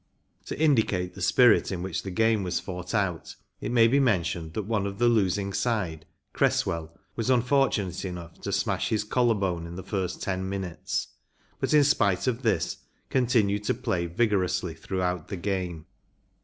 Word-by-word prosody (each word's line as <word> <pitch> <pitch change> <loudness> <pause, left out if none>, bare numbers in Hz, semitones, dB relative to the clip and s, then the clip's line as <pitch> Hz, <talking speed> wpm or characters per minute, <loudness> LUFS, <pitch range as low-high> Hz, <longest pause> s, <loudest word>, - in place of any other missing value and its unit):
To - - -5
indicate 110 - +2
the 95 - -10
spirit 120 +4 +5
in 90 -2 -3
which 95 - -3
the 95 - -6
game 110 +2 +2
was 90 -2 -1
fought 90 +1 -5
out 90 -6 -1 0.2
it 110 - -4
may 115 -2 +6
be 135 +5 +3
mentioned 85 - 0
that 110 - -1
one 100 -1 -1
of 100 0 -6
the 120 - +3
losing 100 -3 +1
side, 100 -7 -1 0.3
Cresswell, 85 0 0 0.2
was 115 +2 -2
unfortunate 125 -7 +2
enough 90 -3 -7
to - - -4
smash - - 0
his 110 -1 +1
collar 120 +1 +2
bone 90 -4 -2
in 85 - -8
the 95 - -6
first 95 -2 -3
ten 95 0 -2
minutes, 95 -3 -3 0.5
but - - -1
in 150 -1 +6
spite 100 -10 +2
of 125 -1 0
this 110 -6 0 0.3
continued 110 -5 +2
to - - +1
play 110 -9 -1
vigorously 90 -3 0
throughout 90 0 -3
the 100 - -5
game. 90 -4 -3
100 Hz, 170 wpm, -27 LUFS, 90-115 Hz, 0.5 s, may